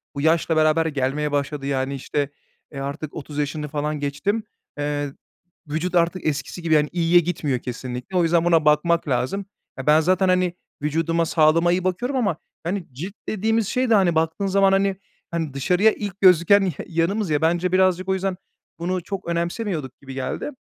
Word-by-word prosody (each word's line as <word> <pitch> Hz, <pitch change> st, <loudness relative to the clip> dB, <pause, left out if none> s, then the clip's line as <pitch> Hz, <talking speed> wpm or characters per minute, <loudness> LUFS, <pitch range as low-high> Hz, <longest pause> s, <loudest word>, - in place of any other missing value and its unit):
bu 140 Hz, -, -3 dB
yaşla 160 Hz, +1 st, +2 dB
beraber 155 Hz, +1 st, +3 dB
gelmeye 145 Hz, 0 st, -1 dB
başladı. 140 Hz, 0 st, -2 dB
Yani, 135 Hz, 0 st, -1 dB
işte, 140 Hz, +1 st, -2 dB, 0.4 s
eee, 140 Hz, -, -7 dB
artık 140 Hz, +2 st, -5 dB
30 150 Hz, -1 st, -8 dB
yaşını 150 Hz, +1 st, -2 dB
falan 150 Hz, 0 st, -2 dB
geçtim. 145 Hz, +10 st, -1 dB, 0.3 s
Eee, 145 Hz, -1 st, -2 dB, 0.5 s
vücut 160 Hz, +5 st, -2 dB
artık 170 Hz, +2 st, +1 dB
eskisi 150 Hz, +4 st, -3 dB
gibi, 165 Hz, -1 st, +1 dB
yani, 150 Hz, -1 st, +3 dB
iyiye 175 Hz, 0 st, +4 dB
gitmiyor 155 Hz, -7 st, -1 dB
kesinlikle 125 Hz, +7 st, -5 dB
o 175 Hz, -, +4 dB
yüzden 165 Hz, 0 st, +2 dB
buna 165 Hz, -3 st, +3 dB
bakmak 160 Hz, +2 st, +3 dB
lazım. 135 Hz, +10 st, -1 dB, 0.3 s
Eee, 130 Hz, -, -6 dB
ben 155 Hz, +1 st, +6 dB
zaten, 185 Hz, +3 st, +2 dB
hani, 180 Hz, -1 st, +2 dB, 0.3 s
vücuduma, 165 Hz, +2 st, 0 dB
sağlığıma 165 Hz, +2 st, +3 dB
iyi 180 Hz, +1 st, +1 dB
bakıyorum 240 Hz, +9 st, -1 dB
ama, 200 Hz, -10 st, +1 dB, 0.3 s
hani, 180 Hz, +1 st, -3 dB
cilt 180 Hz, +10 st, -6 dB
dediğimiz 220 Hz, 0 st, 0 dB
şey 255 Hz, -1 st, 0 dB
de, 225 Hz, -, +5 dB
hani, 180 Hz, -4 st, +3 dB
baktığın 160 Hz, +5 st, 0 dB
zaman, 195 Hz, 0 st, +4 dB
hani, 195 Hz, 0 st, +2 dB, 0.4 s
hani, 160 Hz, -4 st, -2 dB
dışarıya 180 Hz, +10 st, +3 dB
ilk 200 Hz, -2 st, -6 dB
gözüken 185 Hz, +2 st, +6 dB
ya 175 Hz, -7 st, -3 dB
yanımız 175 Hz, +4 st, 0 dB
ya 150 Hz, 0 st, +1 dB
bence 175 Hz, +2 st, +1 dB
birazcık 185 Hz, 0 st, +2 dB
o -, -, +3 dB
yüzden 190 Hz, -1 st, -2 dB, 0.4 s
bunu 180 Hz, 0 st, -2 dB
çok 195 Hz, -1 st, -6 dB
önemsemiyorduk 170 Hz, -, -2 dB
gibi 135 Hz, -1 st, -9 dB
geldi. 135 Hz, -, -3 dB
165 Hz, 175 wpm, -23 LUFS, 150-185 Hz, 0.5 s, ben